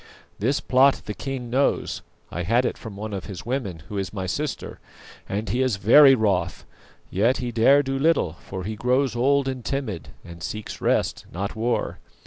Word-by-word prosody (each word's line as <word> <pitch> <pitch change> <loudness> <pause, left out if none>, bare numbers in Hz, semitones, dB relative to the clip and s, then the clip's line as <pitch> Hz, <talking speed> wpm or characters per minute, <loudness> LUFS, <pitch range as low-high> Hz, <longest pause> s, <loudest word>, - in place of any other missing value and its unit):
This 125 +8 +1
plot 135 +2 +4
the 105 - -4
king 130 -1 -5
knows 135 +3 +1 0.3
I 85 - -3
had 115 +8 +2
it - - -1
from 110 -3 -9
one 105 +1 -6
of 95 - -4
his 95 -1 -8
women, 110 - -3
who 105 - -4
is 95 - -3
my 95 -3 -4
sister 145 +10 -4 0.5
and 105 +3 -2
he 120 +7 0
is 130 -5 +2
very 135 +8 +7
wroth, 100 -7 0 0.5
yet 115 +8 +2
he 125 -1 -3
dare 135 +5 +5
do 135 0 -2
little, 150 - +2
for 95 +2 -8
he 110 +3 -4
grows 125 +3 +1
old 135 +3 +2
and 130 -2 -3
timid, 115 - -3 0.2
and 85 0 -11
seeks 110 +6 -6
rest, - - 0
not 100 +4 -4
war. 115 +2 -1
115 Hz, 185 wpm, -24 LUFS, 100-135 Hz, 0.5 s, very